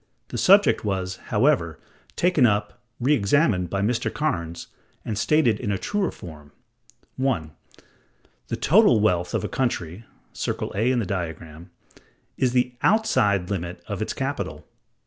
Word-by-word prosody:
The - - -5
subject 200 +2 +5
was, 95 -2 -2
however, 105 - +1 0.4
taken 175 -6 +2
up, 105 -1 -1 0.2
re 130 +5 +2
examined 100 - +2
by 100 +2 -2
Mr. 115 +3 0
Cairnes,(164) 85 - -3 0.4
and 110 - -3
stated 120 -1 +2
in 105 -5 -2
a 100 - 0
truer 205 - -1
form. 75 -4 -12 0.7
(1.) 125 - -1 1.0
The - - -2
total 180 - +5
wealth 90 -4 +1
of - - -1
a - - -1
country 110 -6 -3 0.3
(circle - - -3
A 110 +5 +1
in 130 - +1
the 115 - 0
diagram) 85 -3 -6 0.7
is 130 -2 +1
the 125 0 +1
outside 105 - +2
limit 90 -2 -4
of - - -5
its - - -2
capital. - - -4
105 Hz, 145 wpm, -24 LUFS, 90-130 Hz, 1.0 s, subject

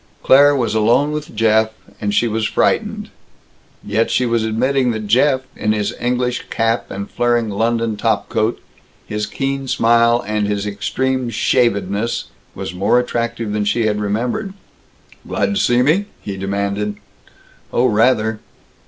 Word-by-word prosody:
Claire 145 +2 +6
was 120 -5 0
alone 115 +7 +3
with 150 -5 -5
Jeff, 110 0 +3 0.3
and 105 -1 -1
she 120 +3 +2
was 110 -1 -1
frightened. - - 0 0.7
Yet 110 +3 0
she 125 - +1
was 115 -1 +1
admitting 125 +4 +1
that 110 -1 -4
Jeff, 130 +5 +3
in 105 0 0
his 105 -1 -1
English 125 0 -1
cap 115 +1 0
and 100 +1 -5
flaring 120 -2 0
London 115 +1 0
top 115 +2 0
coat, 110 +2 -1 0.5
his 105 0 -3
keen 135 0 -3
smile 115 0 +3
and 105 0 -1
his 105 0 -2
extreme 125 +5 -1
shavedness, 110 -2 0 0.3
was 80 - -5
more 95 +6 +2
attractive 115 -3 -2
than 105 0 0
she 105 +3 +1
had 105 -1 0
remembered. 120 - -2 0.7
"Glad 210 - 0
to 200 - +1
see 120 +1 +3
me?" 165 +9 +2
he 100 - -6
demanded. 100 +2 -2 0.8
"Oh, 120 - +2
rather!" 110 -1 +2
115 Hz, 145 wpm, -18 LUFS, 105-125 Hz, 0.8 s, Claire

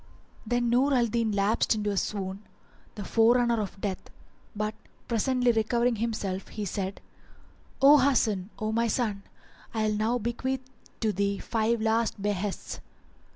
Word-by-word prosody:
Then 240 0 +1
Nur 265 +3 +3
al 245 -2 +4
Din 230 -1 0
lapsed 205 +3 +2
into 210 -1 -1
a - - -2
swoon, 195 0 -2 0.5
the 210 - -5
forerunner 235 +1 +3
of 200 -1 -6
death; 195 -2 -4 0.5
but 215 +1 -2 0.3
presently 245 +2 +2
recovering 235 +1 +1
himself 205 -4 -3
he 210 -1 -5
said, 195 +1 -4 0.8
"O 290 +2 +9
Hasan, 220 -8 +2
O 215 0 -2
my 230 +1 +1
son, 215 -3 -1 0.5
I 215 -1 +1
will 210 - 0
now 225 +3 +1
bequeath 255 +3 -3 0.3
to 220 -2 +1
thee 200 +1 0
five 225 +1 0
last 225 -1 +1
behests. 205 0 -3
220 Hz, 145 wpm, -28 LUFS, 205-235 Hz, 0.8 s, O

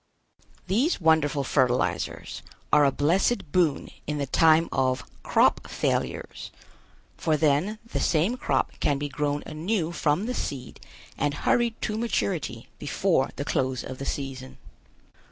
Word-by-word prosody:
These 235 - +1
wonderful 155 -4 +3
fertilizers 125 - 0 0.3
are 150 -1 +7
a 140 - +4
blessed 165 - +1
boon 165 -6 +1 0.2
in 150 0 -2
the 140 - -1
time 160 +4 +4
of 130 -1 +1 0.2
"crop - - +2
failures," - - -2 0.7
for 155 -2 +1
then 155 +8 +2
the 230 - -3
same 175 +9 +2
crop - - 0
can 145 - +1
be 145 +1 -3
grown 145 0 -1
anew 165 +2 -2
from 165 +3 0
the 250 - -2
seed 130 - -5 0.4
and 145 0 0
hurried 235 +8 +1
to 215 0 -1
maturity 180 - -2
before 150 -1 +1
the 140 - -4
close 130 -3 -1
of 130 0 -7
the 140 - -4
season. 130 -2 -5
150 Hz, 135 wpm, -26 LUFS, 140-180 Hz, 0.7 s, are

